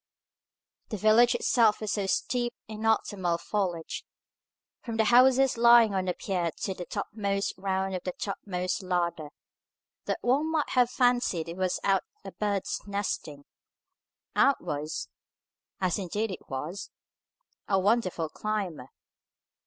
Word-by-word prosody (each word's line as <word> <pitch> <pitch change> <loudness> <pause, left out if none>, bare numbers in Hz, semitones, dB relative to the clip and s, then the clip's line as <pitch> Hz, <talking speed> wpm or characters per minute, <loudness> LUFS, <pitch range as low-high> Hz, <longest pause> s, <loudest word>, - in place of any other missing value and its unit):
The 215 - -3
village 220 +4 +5
itself 225 -4 +3
was 215 -2 -3
so 200 -2 -1
steeped 240 +4 -1
in 220 +1 -4
autumnal 190 -5 +1
foliage, 175 -3 -3 0.8
from 230 -2 -5
the 220 - +4
houses 255 +3 +5
lying 235 -2 +6
on 190 -1 0
the 180 - -1
pier 180 -4 -1
to 195 - -1
the 180 -1 -8
topmost 200 -2 -2
round 190 0 -2
of 185 - -3
the 180 - -3
topmost 185 -2 -3
ladder, 175 -4 -1 0.8
that - - -1
one 285 +6 +1
might 310 -2 0
have 250 -2 +3
fancied 245 -10 +1
it 170 - -6
was 185 -1 -1
out 195 -2 +3 0.2
a 195 - -6
bird's 205 -2 -2
nesting, 175 -8 -3 0.9
and 275 - +5
was 150 +2 -4 0.7
(as 185 0 0
indeed 205 +3 -2
it 185 - -9
was) 155 +9 -5 0.8
a 195 - +2
wonderful 190 -5 +1
climber. 185 -9 -4
200 Hz, 135 wpm, -28 LUFS, 180-225 Hz, 0.9 s, lying